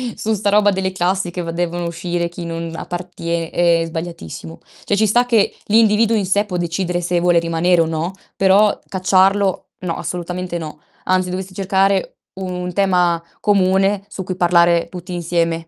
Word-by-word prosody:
su 220 - -1
'sta 205 0 0
roba 210 0 +5
delle 190 -1 -1
classi 185 0 -1
che 180 - -4
v 170 - -5
devono 175 0 -2
uscire 170 0 -2
chi 175 0 -8
non 165 0 -5
appartie 170 -1 -4
è 170 -1 +2
sbagliatissimo. 160 - -7 0.2
Cioè 205 - 0
ci 215 +1 +2
sta 240 +4 +3
che 230 -4 +2
l'individuo 220 +1 +4
in 200 -3 0
sé 205 +2 +2
può 185 - -5
decidere 175 +1 -2
se 175 0 0
vuole 175 0 +3
rimanere 170 +1 +2
o - - +2
no, 165 +2 -2 0.3
però 195 +2 +4
cacciarlo 190 +1 +2
no, 175 -3 -3
assolutamente 180 0 -4
no. 155 -1 -8 0.3
Anzi, 185 -1 +1
dovresti 185 +1 -5
cercare 195 0 +1 0.2
un 180 -1 -4
tema 180 -3 +2 0.2
comune, 195 0 +2
su 190 - -6
cui 185 0 -4
parlare 170 -1 +3
tutti 180 0 -9
insieme. 165 -1 -1
180 Hz, 170 wpm, -19 LUFS, 170-195 Hz, 0.3 s, roba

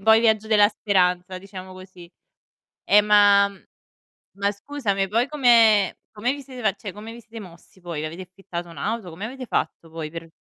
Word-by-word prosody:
un 195 - -17
po' 220 - +7
i 225 - +6
viaggi 220 -2 +2
della 210 -2 +5
speranza, 185 -3 0
diciamo 190 -1 -10
così. 185 -2 -13 0.8
Eh 210 +1 +6
ma 205 -1 +5
mhmm, 200 - -17 0.7
ma 200 0 0
scusami, 200 -4 -2
poi 230 +5 +1
come 230 -8 +4 0.2
come 225 +4 -1
vi 285 - -7
siete 250 -7 -2
cioè 200 -3 -7
come 215 +2 -9
vi 235 - -11
siete 225 0 -11
mossi 180 0 -15
voi? 165 -3 -5
Avete 165 +4 -6
affittato 180 -1 -8
un'auto? 180 +5 -4
Come 185 +6 -8
avete 255 +2 -7
fatto 165 -7 -3
poi 160 -1 -6
per 165 0 -8
200 Hz, 185 wpm, -23 LUFS, 185-220 Hz, 0.8 s, po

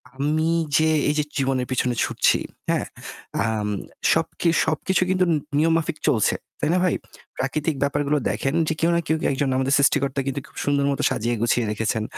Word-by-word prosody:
আমি 155 +4 0 0.3
যে 160 0 +3 0.2
এইযে 150 0 +1
জীবনের 130 -2 0
পিছনে 125 -1 0
ছুটছি, - - +2 0.3
হ্যাঁ? - - +1 0.6
আম 110 -2 -1 0.4
সবকি 170 - 0 0.2
সবকিছু 160 +4 0
কিন্তু 185 -1 +2
নি - - +2 0.2
নিয়মমাফিক 165 0 +1
চলছে, 110 -6 +3 0.2
তাই 150 - 0
না - - +3
ভাই? 180 - +2 0.4
প্রাকৃতিক 150 +4 -1
ব্যাপারগুলো 145 +1 +1
দেখেন 125 +8 -1
যে - - +1
কেউ 165 - +2
না - - +3
কেউ 160 - +2
কে - - -2
একজন 135 0 0
আমাদের 135 +1 +1
সৃষ্টিকর্তা 140 0 +2
কিন্তু 135 +1 -1
খুব - - -20
সুন্দর 140 -1 +2
মত 140 - -3
সাজিয়ে 120 +2 -1
গুছিয়ে 120 0 +2
রেখেছেন। 110 0 -1
140 Hz, 170 wpm, -23 LUFS, 130-155 Hz, 0.6 s, যে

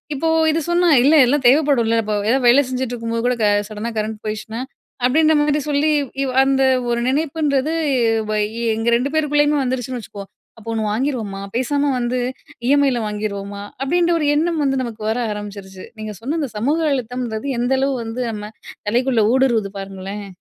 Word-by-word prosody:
இப்போ 310 +4 -1 0.2
இது 320 - 0
சொன்னா, 350 0 +3 0.2
"இல்ல 295 +4 +5
எல்லாம் 275 +1 +1
தேவைப்படும்ல. 270 -6 +3
இப்ப 215 - -2 0.2
ஏதாவது 260 0 +2
வேல 260 +4 +7
செஞ்சுட்டு 255 -1 -3
இருக்கும்போது 230 0 -3
கூட 250 - +1
க - - +4 0.2
சடனா 215 +2 -4
கரண்ட் 215 0 -3
போயிடுச்சுனா" 215 +2 -4 0.4
அப்படின்ற 310 +5 +4
மாரி 295 0 +1
சொல்லி. 290 +1 +2 0.3
இவ் 260 - -2
அந்த 270 0 +2 0.3
ஒரு 235 0 0
நினைப்புன்றது 300 0 0 0.6
வ - - 0 0.4
எங்க 225 +1 -3
2 250 +4 0
பேருக்குள்ளேயுமே 295 -1 +2
வந்துருச்சுன்னு 255 -1 -3
வச்சுக்குவோம். 200 -2 -10 0.3
அப்ப 225 0 -15
ஒண்ணு 220 - -1
வாங்கிருவோமா? 220 -5 -2
பேசாம 285 +3 +1
வந்து 245 +1 -1 0.5
இ. - - +1
எம். 285 0 +3
ஐ. - - 0
ல 240 - -1
வாங்கிருவோமா? 200 -1 -4 0.2
அப்படின்ற 345 +5 +1
ஒரு 300 - 0
எண்ணம் 325 0 +1
வந்து 270 -2 +1
நமக்கு 230 -3 -7
வர 225 - 0
ஆரம்பிச்சுருச்சு. 200 -2 -8
நீங்க 215 -1 -5
சொன்ன 285 +8 -2
இந்த 275 - -2
சமூக 285 +10 +1
அழுத்தம்ன்றது 250 -1 -3
எந்த 245 +2 +1
அளவு 275 0 +1
வந்து 225 +3 -5
நம்ம 210 0 -7 0.4
தலைக்குள்ள 240 0 +2
ஊடுருவுது 240 -6 +2
பாருங்களேன்! 195 +1 -7
250 Hz, 170 wpm, -20 LUFS, 215-285 Hz, 0.6 s, வேல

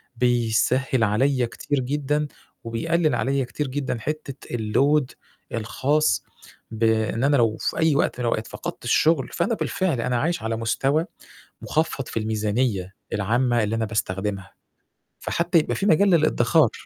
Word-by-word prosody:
بيسهّل 120 +1 +1
عليَّ 125 +4 +2
كتير 125 +5 -2
جدًا، 145 +3 -1 0.4
وبيقلِّل 155 +6 0
عليَّ 135 +2 0
كتير 145 +3 -4
جدًا 130 -3 -3
حتة 150 +1 -5
الload 135 +7 +2 0.5
الخاص 140 +7 +1 0.5
بإن 110 +1 +1
أنا 140 +1 +4
لو 115 -3 +2
في - - -2
أي 160 -3 +3
وقت 125 - 0
من 125 - -1
الأوقات 115 -1 -1
فقدت - - -7
الشُغل 150 +3 +3
فأنا 230 - 0
بالفعل 180 - -1
أنا 125 +1 0
عايش 165 -6 -1
على 115 0 -1
مستوى 135 +8 +1 0.6
مخفض 150 -4 -1
في - - -6
الميزانية 105 -2 -1 0.2
العامة 120 +3 +1
اللي 105 +2 -1
أنا 115 0 0
باستخدمها، 100 -2 -3 0.7
فحتى 170 0 +1
يبقى 155 - -1
في 195 - -2
مجال 200 +2 +4
للإدخار. 155 - +3
125 Hz, 140 wpm, -24 LUFS, 115-150 Hz, 0.7 s, أنا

